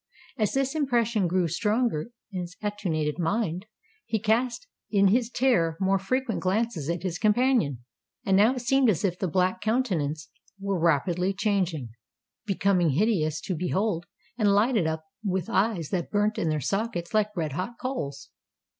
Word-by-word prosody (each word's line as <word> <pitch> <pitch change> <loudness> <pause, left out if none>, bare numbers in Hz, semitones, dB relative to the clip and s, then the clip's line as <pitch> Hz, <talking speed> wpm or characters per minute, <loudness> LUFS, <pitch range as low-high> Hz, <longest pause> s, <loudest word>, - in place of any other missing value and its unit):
As 215 -6 0
this 270 0 0
impression 235 - +1
grew 180 0 +1
stronger 210 - 0 0.2
in 185 -2 -3
his 175 0 -8
attenuated 170 -8 -2
mind, 185 +1 -1 0.4
he 225 - 0
cast 235 - 0 0.2
in 200 -2 +4
his 235 +3 +2
terror 180 -12 +2
more 195 0 +2
frequent 255 +4 -1
glances 190 -5 -1
at 170 0 -2
his 175 -2 -3
companion;—and 205 - 0
now 215 +6 +5
it 250 - -4
seemed 260 +1 +3
as 195 -2 +1
if 180 -2 -1
the 190 - 0
black 185 +3 +1
countenance 180 - -1 0.3
were 195 -2 -1
rapidly 175 +4 +1
changing—becoming 185 - -1
hideous 155 - +1
to 185 - -3
behold, 180 +1 -1 0.3
and 205 -2 +4
lighted 215 -4 +3
up 160 0 -2 0.2
with 190 -4 -2
eyes 190 -6 +1
that 180 -3 -2
burnt 210 +1 +1
in 165 - 0
their 155 -1 0
sockets 195 - -2
like 210 -2 +1
red 155 -3 -1
hot 185 - -3
coals! 145 - -4
195 Hz, 155 wpm, -27 LUFS, 170-225 Hz, 0.4 s, now